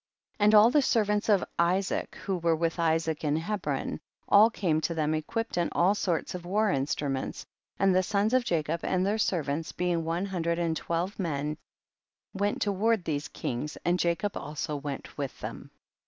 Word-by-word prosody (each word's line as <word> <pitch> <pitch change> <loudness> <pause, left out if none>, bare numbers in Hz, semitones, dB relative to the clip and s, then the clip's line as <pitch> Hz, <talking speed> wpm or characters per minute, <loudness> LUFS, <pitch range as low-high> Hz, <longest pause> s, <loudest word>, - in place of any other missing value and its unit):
62. 205 - -1
And 210 +1 +6
all 215 +3 +8
the 295 +1 +4
servants 210 -4 +1
of 200 -3 +4 0.2
Isaac 185 +3 +1
who 195 -2 -1
were 165 -1 +2
with 165 +1 -1
Isaac 160 -1 +1
in 150 -1 +1
Hebron, 160 -5 -2 0.3
all 210 +3 +7
came 165 -8 0
to 170 - -1
them 155 -1 0
equipped 200 +8 -3
in 170 - +1
all 185 +4 +4
sorts 175 -5 -1
of 180 -1 -6
war 205 +4 +1
instruments, 135 -1 -2 0.3
and 195 -1 +3
the 185 - +4
sons 205 +4 0
of 255 -1 +4
Jacob 165 -5 -1
and 185 0 0
their 210 +3 0
servants, 160 -5 -1
being 175 -2 -1
one 165 +4 -1
hundred 170 -3 -1
and 170 -2 0
twelve 170 +6 -2
men, 150 -4 -2 0.8
went 205 +1 0
to 205 - 0
ward 210 0 +1
these 145 -2 -2
kings, 130 +5 -4
and 175 +1 +2
Jacob 175 +4 0
also 150 +1 -4
went 140 0 -6
with 140 -2 -4
them. - - -7
175 Hz, 185 wpm, -28 LUFS, 155-200 Hz, 0.8 s, all